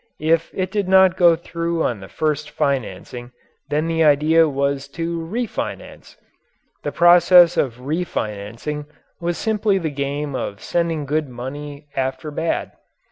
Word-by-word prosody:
If 160 +2 +1
it 185 -1 -2
did 205 -2 -1
not 190 -1 +5
go 170 -2 +5
through 170 0 -3
on 120 -5 -1
the 95 - -10
first 150 +3 -2
financing 120 -1 -3 0.4
then 150 +2 0
the 165 0 +1
idea 155 +2 +4
was 140 0 -1
to 170 0 -2
"refinance." 215 +8 -5 0.7
The - - -3
process 175 0 +6
of 125 -5 0
"refinancing" 135 - -4 0.3
was 170 0 -2
simply 210 -2 +1
the 165 -5 -2
game 140 +1 -3
of 100 -5 -4
sending 165 -3 -1
good 150 0 -1
money 145 +4 -7
after 130 +3 -2
bad. 160 +3 -2
155 Hz, 135 wpm, -21 LUFS, 140-170 Hz, 0.7 s, process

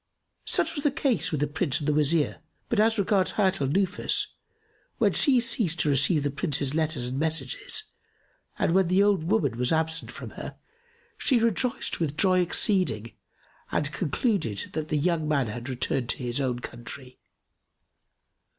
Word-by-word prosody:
Such - - +2
was 290 - -4
the 290 - +4
case 250 - 0
with 150 -3 -2
the 145 - +2
Prince 145 -1 0
and 150 -2 -4
the 150 - +2
Wazir; 150 +1 +1 0.3
but 230 - +1
as 220 +1 +3
regards 200 -1 +1
Hayat 190 -5 +1
al 135 - +1
Nufus, 190 +6 +1 0.7
when - - +2
she 270 -5 +4
ceased 220 -8 +1
to 150 - +1
receive 145 +2 +3
the 145 - -1
Prince's 140 -2 0
letters 155 -5 0
and 130 +2 -3
messages 155 -4 -1 0.7
and - - +1
when 190 -1 +3
the 185 +3 +3
old 200 -5 +2
woman 150 - 0
was 125 0 +1
absent 160 0 0
from - - -8
her, - - -8 0.6
she 260 - +3
rejoiced 230 +2 0
with 155 -3 -2
joy 185 0 +4
exceeding 175 - +1 0.6
and 145 0 0
concluded 170 - -1
that 155 0 -3
the 155 - 0
young 160 0 0
man 140 -4 +1
had 120 +3 -6
returned 125 -1 -2
to - - 0
his 125 +1 -2
own 125 -2 -1
country. 125 +2 -9
160 Hz, 170 wpm, -26 LUFS, 140-190 Hz, 0.7 s, the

